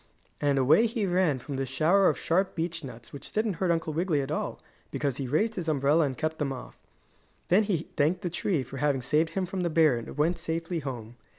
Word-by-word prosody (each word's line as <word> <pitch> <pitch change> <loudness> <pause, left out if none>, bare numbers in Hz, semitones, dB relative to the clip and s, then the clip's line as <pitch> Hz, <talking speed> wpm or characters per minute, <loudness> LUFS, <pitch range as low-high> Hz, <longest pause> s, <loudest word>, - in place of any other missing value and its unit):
And 145 -1 +2
away 155 - +5
he 225 -2 -1
ran 180 -6 +2
from 135 +2 -6
the 135 - -1
shower 165 +9 +4
of - - -1
sharp 185 +3 0
beech 165 0 -3
nuts 120 -3 -10
which 140 - -9
didn't 215 -1 0
hurt 185 +1 0
Uncle 165 -2 0
Wiggily 165 -1 +1
at 135 +1 -4
all 155 - -2 0.3
because 140 -4 -2
he 135 - -3
raised 210 - +1
his 175 -6 -3
umbrella 150 +2 +3
and 130 -2 -3
kept 160 0 -2
them 145 -3 -1
off. 130 - -8 0.7
Then 185 +4 +5
he 175 -6 -1
thanked 155 +7 +2
the 175 - -2
tree 170 -4 0
for 135 +2 -9
having 135 -2 0
saved 150 +5 +2
him 190 0 0
from 185 +1 -4
the 175 - 0
bear 155 -5 +4
and 115 +4 -8
went 165 +4 +1
safely 165 +1 -3
home. 120 -5 -7
155 Hz, 225 wpm, -28 LUFS, 140-175 Hz, 0.7 s, away